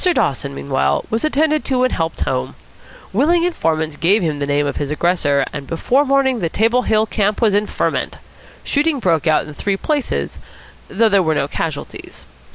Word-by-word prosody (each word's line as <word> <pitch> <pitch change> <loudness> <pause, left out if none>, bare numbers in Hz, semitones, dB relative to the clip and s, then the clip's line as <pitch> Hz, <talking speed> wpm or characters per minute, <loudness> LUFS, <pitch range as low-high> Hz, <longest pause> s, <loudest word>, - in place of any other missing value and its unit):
Dawson, 140 - -1
meanwhile, 100 - 0
was 225 +1 -1
attended 310 0 +1
to 255 -2 +1
and 255 - +1
helped 165 -1 -2
home. 65 - -2 0.6
Willing 330 - +3
informants 160 - -1
gave 190 +6 +3
him 155 -3 -1
the 140 - -2
name 145 +1 +1
of 140 - -3
his 145 - -3
aggressor, 150 -3 +1
and 140 -2 -6
before 250 - +1
morning 270 -2 +2
the 170 -4 -1
Table 230 +7 +2
Hill 220 -2 +2
camp 210 -1 -1
was 220 -3 +3
in 205 +1 +1
ferment. - - -2 0.5
Shooting 295 +1 +1
broke 170 - +1
out 155 - +3
in 150 - -9
three 195 +6 -2
places, 290 +4 -2 0.5
though 225 +4 +2
there 200 -2 +4
were 160 -3 +1
no 140 - 0
casualties. 150 0 -6
190 Hz, 180 wpm, -18 LUFS, 150-250 Hz, 0.6 s, there